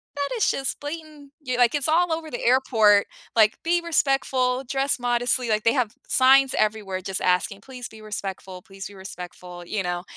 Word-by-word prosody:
"That 285 0 -2
is 445 - +2
just 270 -1 -3
blatant" 300 -1 -8
ye 255 -3 -3
like, 245 -1 +4
"It's 290 -1 0
all 340 +2 +2
over 320 -1 -4
the 240 - -5
airport," 225 -5 +4 0.3
like, 215 -2 +4
"Be 345 +1 +1
respectful, 270 -5 +1
dress 270 +1 -1
modestly," 245 0 0
like, 215 -1 +1
"They 230 - +3
have 245 -5 0 0.2
signs 265 +1 +5
everywhere 210 -3 -1
just 190 +1 -4
asking, 185 +2 0
please 250 0 -9
be 220 - -14
respectful, 195 -3 -6
please 195 +1 -10
be 205 - -14
respectful," 180 -2 -9
you 200 +3 -2
know? 175 0 -3
245 Hz, 185 wpm, -24 LUFS, 200-275 Hz, 0.3 s, signs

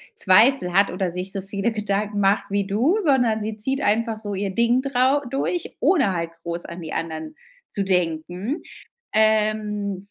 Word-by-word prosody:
Zweifel 200 0 +4
hat 200 +2 +4
oder 185 -1 -2
sich 180 +2 -5
so 195 0 -4
viele 200 +3 -1
Gedanken 210 -1 -2
macht 200 0 +2
wie 200 0 0
du, 235 - +2
sondern 245 -8 +2
sie 215 0 -4
zieht 265 +6 -2
einfach 225 -1 +1
so 210 -2 -5
ihr 195 +1 -2
Ding 235 +2 +3
drau 270 +1 +2
durch, 275 +6 -2
ohne 275 - +3
halt 165 -1 -3
groß 170 0 -5
an 170 +1 -8
die 160 -2 -6
anderen 160 - -4 0.3
zu 200 - -2
denken. 180 - -1 0.5
Ähm, 210 -2 +1
205 Hz, 165 wpm, -23 LUFS, 190-235 Hz, 0.5 s, Zweifel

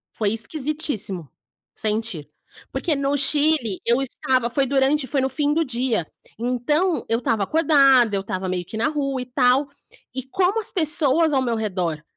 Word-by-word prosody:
Foi 210 -1 0
esquisitíssimo, 230 - -3 0.4
sentir, 215 -7 -3 0.4
porque 325 -4 -1
no 280 0 0
Chile 285 -6 +2
eu 240 +3 +2
estava 255 -2 0
foi 270 +3 +1
durante, 270 +1 +1
foi 270 +2 0
no 265 - 0
fim 290 +2 0
do 330 +2 +2
dia, 245 - -1 0.3
então, 255 - 0
eu 230 - +1
estava 225 -3 0
acordada, 275 - +4
eu 195 - 0
estava 185 -1 -4
meio 180 -1 -2
que 200 - -9
na 225 - +1
rua 275 -3 -2
e - - -5
tal, 250 +2 +2 0.4
e 260 0 -4
como 370 - 0
as 435 - -5
pessoas 315 -2 +2
ao 265 - +3
meu 240 -3 0
redor 180 -8 -2
260 Hz, 170 wpm, -22 LUFS, 225-295 Hz, 0.4 s, acordada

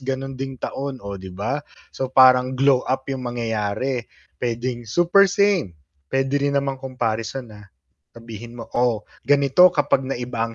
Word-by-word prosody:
gano'n 135 +1 -3
ding 135 0 -5
taon, 135 +2 -4
oh, 100 -1 -6
'di 95 - -8
ba?" 120 +10 -2 0.3
So, 130 - -3
parang 130 0 +5
glow-up 130 -1 +2
'yong 135 - -3
mangyayari. 115 +1 -2 0.4
Puwedeng 120 0 -3
super 175 - +5
same, 195 - +2 0.4
puwede 135 +1 +1
rin 140 0 0
namang 140 -1 0
comparison 125 -1 -3
na 105 -1 -13 0.5
sabihin 115 0 -10
mo 115 - -7
"Oh, 120 -4 +1 0.2
ganito 145 +5 +6
kapag 145 -3 +2
naiba 120 -3 -3
ang 115 - -10
130 Hz, 150 wpm, -22 LUFS, 115-135 Hz, 0.5 s, ganito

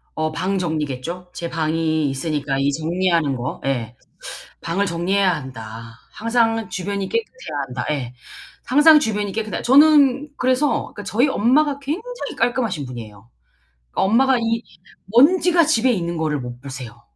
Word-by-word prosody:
어 155 0 -1
방 185 +5 -1
정리겠죠. 160 +1 -3
제 170 - -5
방이 160 -2 0
있으니까 140 0 -2
이 140 +1 +2
정리하는 165 -1 0
거. 125 +2 -5
예. 120 -4 -2 0.7
방을 190 +5 -1
정리해야 180 +1 +1
한다, 115 -4 -9 0.2
항상 225 -1 0
주변이 195 +1 -3
깨끗해야 460 - -4
한다. 125 0 -5
예. 130 -5 -3 0.5
항상 295 +4 +6
주변이 210 -7 -2
깨끗해야 215 0 -3
저는 285 +1 +5
그래서 260 +3 +1
그 205 - -7
저희 215 +9 +2
엄마가 275 +5 +2
굉장히 415 - -5
깔끔하신 230 - -1
분이에요. 115 -4 -10 0.6
그 - - -3
엄마가 255 +6 +3
이 230 0 -1 0.4
먼지가 335 - +4
집에 260 -5 +2
있는 170 -5 -2
거를 155 -2 -1
못 125 -1 -8
보세요. 130 -4 -9
185 Hz, 310 characters per minute, -21 LUFS, -, 0.7 s, 항상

